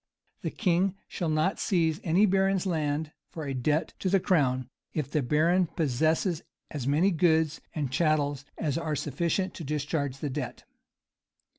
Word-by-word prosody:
The - - -2
king 185 -1 +1
shall 170 -3 -3
not 155 +5 +1
seize 165 -4 +1
any 180 +5 +4
baron's 195 -1 +2
land 155 -3 -1 0.2
for 160 -2 -6
a 135 - -2
debt 150 +5 0
to 190 - 0
the 195 +1 +4
crown 130 -9 +2 0.3
if 150 -3 -2
the 150 - +1
baron 165 +7 +3
possesses 160 +4 +1 0.3
as 140 -5 -4
many 160 +8 +3
goods 160 -2 +2
and 145 -5 -2
chattels 145 -2 +1
as 155 -1 -1
are 160 -2 -2
sufficient 170 +7 -1
to 170 - -7
discharge 145 -1 -2
the 145 0 -3
debt. 130 -3 -5
155 Hz, 155 wpm, -28 LUFS, 145-175 Hz, 0.3 s, any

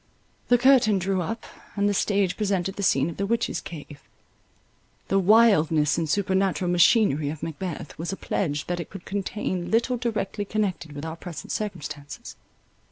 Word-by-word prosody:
The 245 - +5
curtain 240 -5 +5
drew 190 0 0
up, 225 +7 -4 0.3
and 205 0 +2
the 205 - +2
stage 200 -2 +1
presented 195 -2 -1
the - - -5
scene 140 -7 +3
of 170 - -6
the 200 - -1
witches' 230 +2 0
cave. 145 -3 -9 1.1
The 195 - +3
wildness 175 -8 +4
and 165 -2 -2
supernatural 190 -1 +1
machinery 175 - +4
of 150 0 -6
Macbeth, 165 -1 -5
was 170 +3 -3
a 195 - -4
pledge 150 -6 -2
that 175 0 -3
it 170 - -6
could 195 -3 -10
contain 190 -2 -3
little 235 +3 +2
directly 215 -4 -2
connected 200 -7 -2
with 145 +2 -6
our 160 0 -5
present 170 -2 -8
circumstances. 145 -8 -5
190 Hz, 165 wpm, -25 LUFS, 160-205 Hz, 1.1 s, The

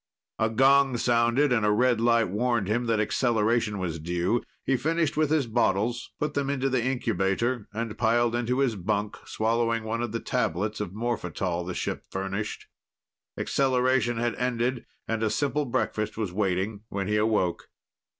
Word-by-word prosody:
A 110 - +2
gong 135 +2 +4
sounded, 120 +4 +3
and 110 -3 +2
a 105 - +3
red 120 +2 +3
light 115 -1 +3
warned 115 0 0
him 120 +3 0
that 115 -2 +2
acceleration 110 -1 +1
was 85 -4 -3
due. 90 +8 0 0.2
He 135 - +2
finished 160 +3 0
with 155 -1 +2
his 155 -3 +2
bottles, 115 0 0
put 150 0 -1
them 140 -1 -1
into 135 -1 0
the 130 -3 +1
incubator, 120 -2 0
and 110 0 -4
piled 115 +1 +2
into 120 +1 0
his 125 -5 +1
bunk, 105 +2 -2
swallowing 115 +1 0
one 115 +1 -2
of 120 -2 -2
the 115 - -2
tablets 105 +4 -1
of 100 -4 -4
morphetal 90 -6 -2
the 90 - -4
ship - - -3
furnished. 95 +2 -4 0.7
Acceleration 130 -2 +1
had 120 0 0
ended, 125 0 -1 0.2
and 115 -1 -1
a 110 - +2
simple 145 +5 0
breakfast 110 -4 -2
was 105 -5 -3
waiting 100 +1 -1
when 100 -1 -3
he 105 0 +1
awoke. 105 -5 0
115 Hz, 165 wpm, -27 LUFS, 105-125 Hz, 0.7 s, gong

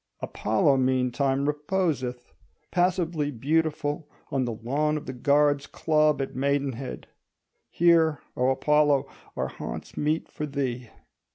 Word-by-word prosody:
Apollo 110 +6 +1
meantime 130 +1 +1
reposeth, 150 -5 -2 0.4
passively 175 -4 +1
beautiful, 150 +2 -1 0.2
on 135 -2 +1
the 120 - -2
lawn 145 +7 -1
of 150 - -7
the 130 - -5
Guards' 145 +2 +2
Club 155 -3 +2
at - - -7
Maidenhead. 135 -1 -2 0.6
Here, 165 -4 +4 0.2
O 125 +1 +2
Apollo, 145 +1 +3 0.3
are - - -1
haunts - - -7
meet 155 +2 0
for 150 -1 -5
thee. 130 -4 -3
145 Hz, 115 wpm, -26 LUFS, 130-150 Hz, 0.6 s, Here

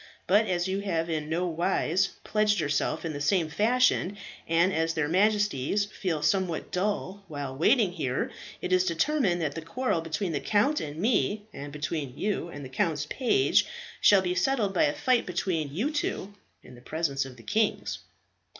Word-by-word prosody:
But 210 +4 +4
as 175 0 0
you 190 +1 -1
have 170 -5 -1
no 160 +2 -1
wise 175 +2 +1 0.2
pledged 210 -1 +2
yourself 145 +1 -1
in 160 - -3
the 145 - -5
same 160 +2 +2
fashion, 215 0 +2 0.3
and 170 +3 +3
as 165 0 0
their 155 -2 +1
Majesties 205 -1 +2
fell 180 -7 -3
somewhat 170 +1 0
dull 200 +1 -2
while 145 -4 -5
waiting 190 - +3
here, 140 -7 -2 0.3
it 185 - 0
is 185 0 +4
determined 185 - +1
that 145 -3 -1
the 165 - -5
quarrel 165 +2 -1
between 165 +3 -2 0.7
me, 210 0 +1
and 145 +1 -7
between 145 -2 -4
you 200 -4 -1
and 145 -4 -8
the - - -8
count's 150 +3 0
page, 340 +10 +3 0.3
shall 200 -2 +6
be 180 -1 0
settled 210 0 +1
by 315 - +4
a 295 - +1
fight 255 -4 +1
between 175 -5 -1
you 230 - -1 0.7
in 125 - -14
the 120 - -14
presence 140 -1 -1
of 130 -2 -10
the 115 - -14
kings." 215 - 0
175 Hz, 165 wpm, -28 LUFS, 155-205 Hz, 0.7 s, shall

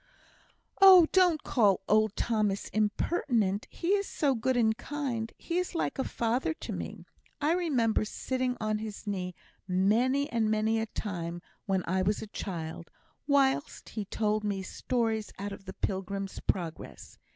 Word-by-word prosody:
"Oh, 375 -3 +10
don't 355 -5 +4
call 205 -7 +3
old 215 0 +3
Thomas 210 -4 0
impertinent. 215 - 0
He 340 - -4
is 400 0 +2
so 285 -3 +1
good 255 +1 0
and 220 -2 +3
kind, 240 -3 -3
he 345 +1 -2
is 360 0 -3
like 330 - -1
a - - +2
father 245 +8 -1
to - - -6
me. - - -6 0.3
I 300 - +2
remember 270 -13 +1
sitting 255 +3 -2
on 215 -1 -1
his 215 -1 -7
knee 180 -3 -3 0.3
many 230 +10 +2
and 225 -2 +1
many 220 +1 +2
a 220 - -2
time 175 -6 -4 0.3
when 190 -2 +1
I 185 +2 +1
was 200 +3 +1
a 215 - -11
child, 165 -3 -5 0.4
whilst 280 0 +1
he 215 -3 -4
told 215 +1 0
me 200 -2 -2
stories 225 +1 -1
out 200 +1 -4
of 195 0 -9
the 190 - -7
'Pilgrim's 195 0 -3
Progress.' 170 -4 -4
220 Hz, 155 wpm, -30 LUFS, 200-260 Hz, 0.4 s, Oh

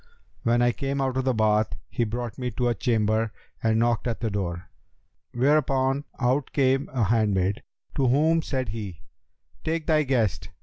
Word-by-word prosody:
When 120 +1 +2
I 120 - +4
came 140 +3 -3
out 135 -1 0
of 130 - 0
the 130 - +2
Bath 110 0 +2
he 120 - -1
brought 120 +2 -4
me 125 -1 -1
to 120 +1 0
a - - +2
chamber 110 -1 +1 0.3
and 110 0 +2
knocked 120 +1 +1
at 115 - -2
the 115 -2 -2
door, 90 -3 -3 0.6
whereupon 135 +1 +2
out 130 +2 +1
came 135 0 +2
a 125 -4 0
handmaid, 100 -3 +1 0.4
to 135 - +3
whom 155 +6 +3
said 130 -6 -2
he, 100 -5 -6 0.6
'Take 160 0 -1
thy 155 -2 +3
guest!' 115 - 0
120 Hz, 170 wpm, -26 LUFS, 110-135 Hz, 0.6 s, I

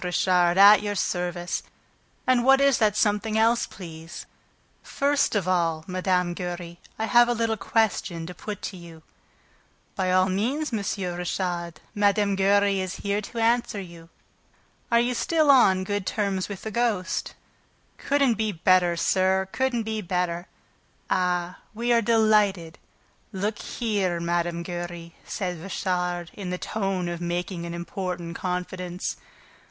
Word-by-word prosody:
Richard, 180 0 +2
at 205 +2 +8
your 205 0 -3
service. 175 -2 -2 0.6
And 255 -2 +3
what 270 +1 +6
is 275 -2 +4
the 215 -2 +4
something 215 +1 +1
else, 230 +2 +3
please?" 165 -3 -9 0.6
"First 280 -3 0
of 195 -3 0
all, 165 -3 +1
Mme. 180 -1 0
Giry, 175 -1 -6 0.2
I 220 - -1
have 240 +1 +5
a 240 - +1
little 225 -1 0
question 195 -6 0
to 180 - -7
put 205 +4 -7
to 190 - -5
you." 165 -2 -13 0.9
"By 185 -1 0
all 185 0 +4
means, 240 +10 -1
M. 220 - 0 0.4
Richard: 175 -2 -3
Mme. 205 -1 +2
Giry 200 0 +3
is 185 0 -3
here 200 +1 0
to 230 - -9
answer 230 -2 +1
you." 170 -3 -11 0.8
"Are 235 - +5
you 240 +1 +1
still 310 +3 +3
on 190 -8 +5
good 205 -1 -3
terms 200 -3 -1
with 200 -2 -7
the 220 - -4
ghost?" 220 -5 -1 0.6
"Couldn't 275 -6 +1
be 215 -1 +1
better, 180 -1 +3
sir; 190 +2 +1
couldn't 260 -3 0
be 220 0 -3
better." 180 -2 -2 0.6
"Ah, 180 -1 0 0.2
we 240 +2 +1
are 235 - +4
delighted... 210 -7 +2 0.5
Look 205 +2 -2
here, 200 -7 -1
Mme. 170 0 -1
Giry," 175 -1 -6
said 180 -5 -4
Richard, 180 -2 -2
in 195 -3 -6
the 180 - -2
tone 195 -3 -2
of 175 0 -4
making 175 0 -3
an 170 - -5
important 175 -1 -5
confidence. 180 0 -4
190 Hz, 145 wpm, -25 LUFS, 175-215 Hz, 0.9 s, at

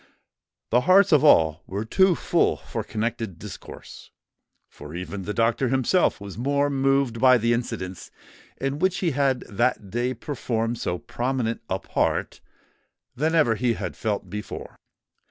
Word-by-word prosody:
The 120 +2 +4
hearts 195 +1 +6
of 150 -2 +5
all 80 - +5
were 100 +3 -4
too 190 - +4
full - - +1
for - - -5
connected 110 -4 -3
discourse; - - -11 0.6
for 75 +2 -11
even 90 +2 -6
the 105 - -3
doctor 115 +3 +1
himself 135 +8 +2
was 100 +1 -8
more 140 +2 +1
moved 135 -3 +1
by 130 0 +6
the 115 +1 +1
incidents 105 -6 -4 0.5
in 135 +2 -2
which 185 +1 +1
he 175 -3 0
had 135 -2 +1
that 105 -2 -1
day 120 +2 -1
performed 115 -3 -3
so 90 - -2
prominent 120 +2 -2
a 95 - 0
part, - - -1 0.7
than 160 +5 0
ever 150 -8 +4
he 120 +2 0
had - - -5
felt 105 -3 -2
before. 105 +3 -7
120 Hz, 150 wpm, -24 LUFS, 105-135 Hz, 0.7 s, hearts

